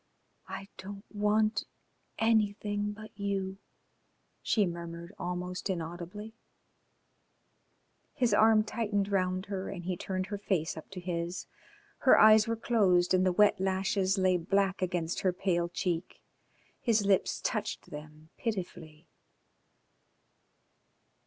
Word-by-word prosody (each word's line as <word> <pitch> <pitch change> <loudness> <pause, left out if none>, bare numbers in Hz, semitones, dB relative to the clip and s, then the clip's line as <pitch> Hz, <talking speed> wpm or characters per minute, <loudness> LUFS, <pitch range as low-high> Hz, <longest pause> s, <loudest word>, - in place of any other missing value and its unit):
"I 195 - -7
don't 200 +1 -8
want 215 +1 +2 0.5
anything 210 -2 +1
but 215 +1 -10
you," 195 -1 -2 0.8
she 210 -3 +2
murmured 170 +1 -6
almost 180 +2 -4
inaudibly. 175 +5 -5 1.8
His 240 -4 +2
arm 215 +1 +6
tightened 205 -2 -1
round 185 -1 0
her 195 -1 -4
and 180 -3 -6
he 180 +1 -2
turned 185 +1 -3
her 205 - -3
face 185 -6 -1
up 160 - -10
to 195 - -7
his. 175 0 -3 0.5
Her 260 - +6
eyes 215 0 +7
were 230 - 0
closed 195 -7 +3
and 185 0 +4
the 185 - +3
wet 205 +2 +4
lashes 190 +1 +1
lay 185 -1 +3
black 195 +2 +1
against 175 -2 -1
her 185 - +2
pale 175 -2 0
cheek. 175 -1 -3 0.6
His 220 -3 +2
lips 195 -2 +2
touched - - -3
them 155 +1 -10
pitifully. 175 -7 -5
190 Hz, 120 wpm, -30 LUFS, 175-205 Hz, 1.8 s, eyes